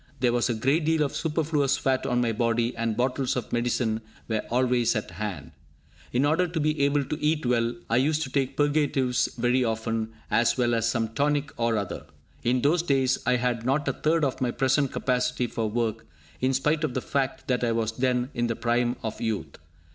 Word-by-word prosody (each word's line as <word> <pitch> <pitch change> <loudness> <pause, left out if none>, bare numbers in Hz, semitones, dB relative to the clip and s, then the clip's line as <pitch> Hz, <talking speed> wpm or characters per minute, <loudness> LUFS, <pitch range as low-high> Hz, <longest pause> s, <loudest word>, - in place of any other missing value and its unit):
There 125 -2 +2
was 120 +1 +1
a 120 - 0
great 135 +9 +1
deal 160 0 +2
of 140 - -3
superfluous 150 -3 +1
fat 135 -2 0
on 125 0 +1
my 120 -1 +1
body, 115 +1 0
and 115 -1 -1
bottles 125 +1 0
of 125 - -4
medicine 120 -2 0 0.3
were 110 -2 0
always 125 -1 +2
at 105 - -3
hand. 95 -10 -5 0.6
In 125 +3 +2
order 165 +5 +2
to 170 -1 -3
be 155 -1 0
able 140 0 +2
to 150 +2 -5
eat 155 -1 +1
well, 120 -1 +1
I 115 - +2
used 150 +4 +2
to 135 - -6
take 135 -1 -1
purgatives 145 -4 +2
very 125 +2 +2
often, 110 -1 -2 0.2
as 120 +2 +3
well 120 -1 +2
as 115 0 +1
some 115 -2 0
tonic 145 +4 0
or 115 -1 +1
other. 100 -3 -4 0.3
In 125 +1 +1
those 160 +4 +3
days, 135 -5 +1
I 125 - +4
had 120 -1 -1
not 135 +4 0
a - - +1
third 160 0 +1
of 130 - -3
my 125 - +1
present 135 +2 +1
capacity 125 -1 0
for 115 -2 -2
work, 115 0 -2 0.3
in 130 +1 +1
spite 150 +4 +1
of 140 -5 -1
the 130 - 0
fact 135 0 -2
that 125 -1 0
I 120 - +2
was 115 -1 0
then 125 +2 0
in 120 0 0
the 115 - -1
prime 120 +1 +1
of 110 -1 -4
youth. 110 -3 -3
125 Hz, 210 wpm, -26 LUFS, 115-140 Hz, 0.6 s, I